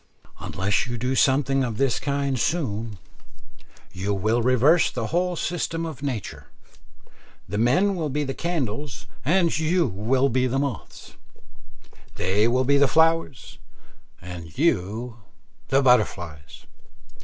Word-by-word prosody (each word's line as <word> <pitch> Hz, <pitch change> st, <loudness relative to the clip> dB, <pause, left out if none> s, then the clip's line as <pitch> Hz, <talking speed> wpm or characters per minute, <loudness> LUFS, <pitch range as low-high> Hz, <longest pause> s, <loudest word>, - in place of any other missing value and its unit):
Unless 95 Hz, +5 st, -1 dB
you 120 Hz, -1 st, -4 dB
do 125 Hz, +3 st, -1 dB
something 135 Hz, 0 st, +2 dB
of 115 Hz, -4 st, -3 dB
this 135 Hz, -2 st, +1 dB
kind 140 Hz, -2 st, -1 dB
soon, 115 Hz, -, -2 dB, 1.0 s
you 95 Hz, +2 st, -2 dB
will 110 Hz, +5 st, +1 dB
reverse 130 Hz, +7 st, +4 dB
the 120 Hz, -3 st, -4 dB
whole 180 Hz, +1 st, +1 dB
system 165 Hz, -1 st, -2 dB
of 155 Hz, -5 st, -7 dB
nature. 130 Hz, -8 st, -5 dB, 1.0 s
The 105 Hz, +4 st, -3 dB
men 180 Hz, -, +3 dB
will 160 Hz, -4 st, -2 dB
be 145 Hz, +2 st, -1 dB
the 135 Hz, -1 st, -3 dB
candles 145 Hz, -5 st, -3 dB, 0.2 s
and 170 Hz, +3 st, +2 dB
you 160 Hz, -, +1 dB, 0.4 s
the 130 Hz, +1 st, +1 dB
moths; 135 Hz, -5 st, -5 dB, 1.0 s
they 100 Hz, +4 st, +1 dB
will 125 Hz, +2 st, +2 dB
be 140 Hz, +2 st, +4 dB
the 140 Hz, 0 st, +5 dB
flowers, 160 Hz, -5 st, +1 dB, 0.6 s
and 85 Hz, -2 st, -9 dB
you 115 Hz, -, 0 dB, 0.5 s
the 135 Hz, +1 st, +2 dB
butterflies. 85 Hz, -, 0 dB
130 Hz, 120 wpm, -24 LUFS, 110-150 Hz, 1.0 s, the